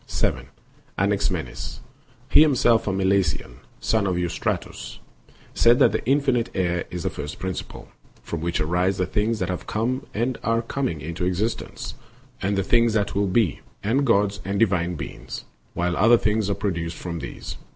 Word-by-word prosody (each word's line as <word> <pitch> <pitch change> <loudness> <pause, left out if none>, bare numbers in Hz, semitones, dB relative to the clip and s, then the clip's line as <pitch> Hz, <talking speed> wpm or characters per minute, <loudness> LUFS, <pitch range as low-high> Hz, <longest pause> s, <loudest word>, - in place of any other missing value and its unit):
560. - - -1 0.5
Anaximenes, - - -1 0.5
himself 125 -7 +5
a - - +2
Milesian, 95 -9 +1 0.2
son 110 -3 +1
of 95 - +1
Eurystratos, 85 -7 -3 0.6
said 120 +1 +5
that - - +4
infinite 135 -4 +2
air 90 -2 0
is 90 -2 -5
the - - 0
first 75 0 -6
principle," 95 0 -5 0.4
from 85 - -4
which 85 +1 -1
arise 90 +5 +1
the 90 - +1
things 105 +5 0
that 95 -3 -2
have 90 - -4
come 125 +6 -1
and 120 +3 -1
are 115 0 +1
coming 115 - -2
into 85 +3 -4
existence, 95 +6 -2 0.5
and 100 +1 0
the 95 - +2
things 115 +2 +3
that 105 -2 +1
will 100 0 +1
be, 95 -3 +2 0.2
and 125 +7 +2
gods 100 -5 +2
and 100 +2 -2
divine 90 -5 +2
beings, - - -7 0.3
while 85 0 0
other 115 +4 +6
things 105 -2 +1
are 100 - +1
pro 100 - -1
duced 85 -1 -4
from 85 -2 -5
these. 70 - -7
100 Hz, 160 wpm, -24 LUFS, 90-115 Hz, 0.6 s, other